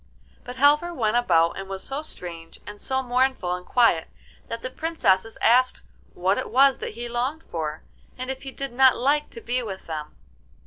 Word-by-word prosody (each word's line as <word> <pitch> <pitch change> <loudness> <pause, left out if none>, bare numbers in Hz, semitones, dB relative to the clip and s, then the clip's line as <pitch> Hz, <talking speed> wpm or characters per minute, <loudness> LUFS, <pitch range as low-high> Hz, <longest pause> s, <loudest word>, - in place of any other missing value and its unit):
But 250 - -8
Halvor 295 +6 +3
went 220 -4 +1
about 170 -8 +3
and 195 0 -7
was 195 0 -5
so 275 +2 -3
strange 170 - -9
and 205 0 -9
so 265 0 -1
mournful 250 -7 +1
and 180 0 -5
quiet 205 -8 +3 0.4
that 230 0 -6
the 255 - -4
Princesses 225 - 0
asked 255 +2 +4 0.3
what 190 +3 +1
it - - -4
was 270 +1 +4
that - - -6
he 240 +1 -5
longed 255 +7 -2
for, 155 -2 -4 0.3
and 255 +1 -3
if 265 - -6
he 275 - -7
did 275 -1 -6
not 260 +1 +5
like 290 +4 +1
to 230 - -10
be 245 +2 -1
with 195 -5 -7
them. 155 -2 -6
240 Hz, 190 wpm, -24 LUFS, 190-265 Hz, 0.4 s, not